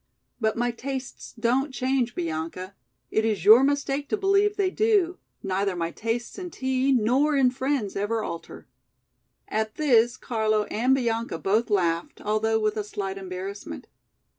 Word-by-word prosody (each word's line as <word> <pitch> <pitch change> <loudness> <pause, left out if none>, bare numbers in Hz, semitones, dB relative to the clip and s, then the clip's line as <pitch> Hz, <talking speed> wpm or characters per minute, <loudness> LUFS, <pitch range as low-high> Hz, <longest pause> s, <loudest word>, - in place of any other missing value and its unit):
"But 220 -2 +1
my 240 +1 +1
tastes 260 +2 -6
don't 260 +5 +1
change, 255 -1 0
Bianca. 170 +3 -4 0.4
It 220 - +2
is 210 -5 -1
your 225 +5 +9
mistake 285 0 0
to 430 - 0
believe 400 +1 +2
they 385 -2 +1
do, 405 -5 +2 0.2
neither 195 0 -1
my 170 -1 -2
tastes 230 - -3
in 360 -1 -5
tea 260 -2 0
nor 260 +5 +3
in 260 -2 +4
friends 260 -5 -2
ever 215 +3 -1
alter." 170 - -7 0.8
At 220 0 -2
this 240 -6 +3
Carlo 215 -2 0
and 250 +5 +3
Bianca 230 -7 -1
both 215 +7 +1
laughed, 170 -5 0
although 215 +1 +1
with 215 0 0
a 210 - -1
slight 195 -1 -5
embarrassment. 185 - -7
230 Hz, 150 wpm, -25 LUFS, 205-270 Hz, 0.8 s, your